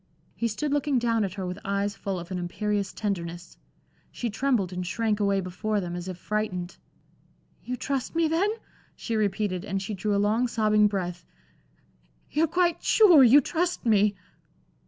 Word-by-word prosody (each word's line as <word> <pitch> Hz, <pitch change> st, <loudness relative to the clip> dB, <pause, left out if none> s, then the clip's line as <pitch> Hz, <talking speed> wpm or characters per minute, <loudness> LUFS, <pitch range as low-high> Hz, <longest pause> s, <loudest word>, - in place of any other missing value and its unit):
He 235 Hz, -, -1 dB
stood 280 Hz, +7 st, -2 dB
looking 290 Hz, -2 st, +1 dB
down 230 Hz, -2 st, +1 dB
at 190 Hz, -1 st, -3 dB
her 190 Hz, -2 st, -4 dB
with 180 Hz, +2 st, -5 dB
eyes 200 Hz, +1 st, -1 dB
full 195 Hz, -1 st, -4 dB
of 170 Hz, +2 st, -10 dB
an 185 Hz, -, -2 dB
imperious 200 Hz, +3 st, -2 dB
tenderness. 175 Hz, -4 st, -4 dB, 0.6 s
She 235 Hz, -2 st, -3 dB
trembled 220 Hz, -6 st, 0 dB
and 180 Hz, 0 st, -3 dB
shrank 215 Hz, +3 st, -1 dB
away 200 Hz, -1 st, +2 dB
before 205 Hz, +4 st, -2 dB
them, 175 Hz, -2 st, -4 dB
as 175 Hz, +1 st, -6 dB
if 185 Hz, -2 st, -5 dB
frightened. 185 Hz, -3 st, -3 dB, 0.9 s
"You 250 Hz, 0 st, -4 dB
trust 270 Hz, +3 st, -3 dB
me, 330 Hz, -1 st, +3 dB
then?" 335 Hz, +6 st, +1 dB, 0.5 s
she 230 Hz, -, -4 dB
repeated, 200 Hz, -3 st, -1 dB
and 195 Hz, -2 st, -2 dB
she 195 Hz, +2 st, -5 dB
drew 205 Hz, +2 st, -1 dB
a -, -, +2 dB
long 215 Hz, +5 st, +2 dB
sobbing 215 Hz, -2 st, +3 dB
breath. 180 Hz, -4 st, -3 dB, 1.1 s
"You're 315 Hz, +3 st, +2 dB
quite 345 Hz, +1 st, +1 dB
sure 360 Hz, -11 st, +7 dB
you 260 Hz, +4 st, +7 dB
trust 345 Hz, +2 st, -2 dB
me?" 210 Hz, -2 st, +3 dB
210 Hz, 170 wpm, -26 LUFS, 190-245 Hz, 1.1 s, sure